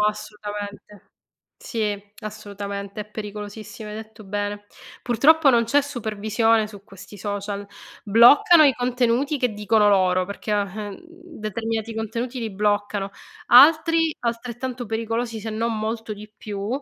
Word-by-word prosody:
assolutamente. 210 -1 -5 0.5
Sì, 210 -4 -2 0.2
assolutamente. 200 -1 -6
È - - -14
pericolosissimo, 210 +1 -7
hai - - -7
detto 220 0 -10
bene. 205 +1 -4 0.4
Purtroppo 285 +6 +4
non 235 -2 +3
c'è 285 +5 +3
supervisione 225 -3 0
su 205 -2 -12
questi 195 +1 -13
social. 205 0 -4 0.4
Bloccano 245 - +7
i 280 - +6
contenuti 250 +3 0
che 250 -2 +1
dicono 210 0 +3
loro 185 -2 +3
perché, 200 +1 -5
o 205 - +3
ehm, 205 +1 -5
determinati 225 - -5
contenuti 230 +3 -4
li 225 -1 -3
bloccano; 205 0 -1 0.4
altri, 320 +4 +6
altrettanto 240 +1 -4
pericolosi, 225 +1 -2
se 220 - -6
non 225 +1 -1
molto 220 0 -3
di 210 +1 -12
più, 205 -1 -5
215 Hz, 130 wpm, -23 LUFS, 205-235 Hz, 0.5 s, Bloccano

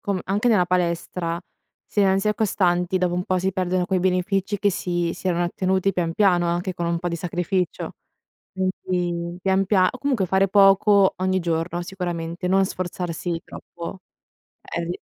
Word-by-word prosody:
com 200 -2 -1
anche 205 +5 +1
nella 205 -6 +4
palestra, 170 -1 -1 0.5
se 205 - +1
non 190 -1 +4
si 195 - -2
è 210 - +2
costanti, 185 -3 +1
dopo 180 -1 0
un 180 - 0
po' 185 0 0
si 190 +2 0
perdono 185 -1 0
quei 185 -1 +1
benefici 190 +2 0
che 205 - +2
si 175 -3 -1
si 185 - -4
erano 175 0 +1
ottenuti 190 +2 0
pian 170 -2 -1
piano, 180 -4 +3
anche 175 +2 -1
con 170 - -3
un 170 0 0
po' 175 - -5
di 170 - -1
sacrificio. 175 +1 -2 0.6
Quindi 180 -2 -2
pian 190 0 +2
pia 185 -2 +3
o 255 - -10
comunque 255 -9 0
fare 190 +2 +3
poco, 195 0 +5
ogni 185 0 0
giorno 170 +1 -1
sicuramente, 175 -1 -4
non 190 +1 +3
sforzarsi 175 -2 -3
troppo. 170 +2 -8 0.6
Eh, 170 0 -4
di 175 - -4
180 Hz, 175 wpm, -23 LUFS, 175-190 Hz, 0.6 s, poco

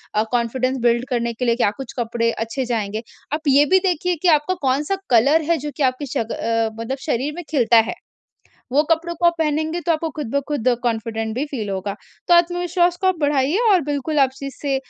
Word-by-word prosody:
अ, 215 - +3
confidence 255 +2 0
build 240 +1 +2
करने 235 -1 -1
के 250 +2 -3
लिए 235 -1 +3
क्या 220 -4 +2
कुछ 270 -3 -7
कपड़े 230 0 0
अच्छे 230 +4 -3
जाएँगे? 220 -2 -2 0.3
आप 310 - -1
ये 280 +2 +5
भी 375 +5 +4
देखिए 360 +1 0
कि - - +3
आपका 335 +6 -3
कौन-सा 285 +8 +1
कलर 275 +7 +4
है 335 - +3
जो 295 +1 -5
कि 295 - 0
आपके 260 +2 0
शक 230 -2 -3
अ, 230 -1 0
मतलब 265 +4 -3
शरीर 285 +3 -1
में 350 - -6
खिलता 240 -5 +4
है। - - -7 0.8
वो 290 +3 +4
कपड़ों 340 +1 +1
को 345 - -1
आप 340 - +5
पहनेंगे 315 +2 0
तो - - +4
आपको 320 0 -1
खुद-ब-खुद 280 -2 -2 0.2
कॉन्फिडेंट 225 -1 -2
भी 280 +4 -1
फील 225 -8 -4
होगा, 195 +1 -3 0.3
तो 350 - +5
आत्मविश्वास 350 0 +2
को 375 - +2
आप 370 - +2
बढ़ाइए। 290 +3 +1
और 365 -3 +4
बिल्कुल 290 +1 -1
आप 270 -1 +5
इस 275 - -6
से 280 -2 0
275 Hz, 210 wpm, -21 LUFS, 235-315 Hz, 0.8 s, ये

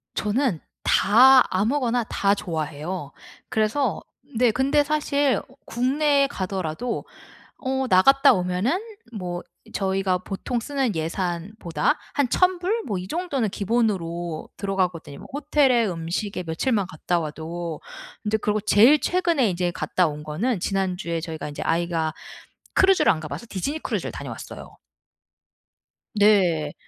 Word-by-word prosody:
저는 215 - 0 0.2
다 255 +6 +6
아무거나 240 +3 +1
다 200 -1 +1
좋아해요. 160 -3 -4 0.4
그래서 220 +3 0 0.4
네. 245 -1 +4
근데 275 +5 +2
사실 285 -4 +1 0.2
국내에 280 +3 +2
가더라도 190 - -3 0.5
어 265 0 -1
나갔다 245 +8 +6
오면은 185 - 0 0.3
뭐 180 -5 -5 0.3
저희가 190 -1 0
보통 195 +6 -4
쓰는 270 -3 -1
예산보다 175 - -2 0.2
한 285 -3 +2
1000 365 0 +3
불 410 +6 -1
뭐 205 - -2
이 180 - -6
정도는 280 - -1
기본으로 180 -7 -1
들어가거든요. 185 -7 -2
뭐 - - -11
호텔에 280 -5 +3
음식에 180 +2 -3
며칠만 190 +5 0
갔다 175 +2 -2
와도. 160 +1 -5 0.4
근데 215 +1 0
그러고 210 0 0
제일 230 +8 +6
최근에 340 - +1
이제 175 0 -1
갔다 180 +1 +1
온 150 0 -7
거는 185 +9 -1
지난주에 180 -3 -1
저희가 160 -2 -6
이제 145 - -7
아이가 165 -1 0 0.6
크루즈를 385 -1 +5
안 160 - -4
가봐서 155 +7 -7
디즈니 275 - -3
크루즈를 - - -3
다녀왔어요. - - -8 1.4
네. 185 -8 +3
200 Hz, 285 characters per minute, -24 LUFS, 175-260 Hz, 1.4 s, 다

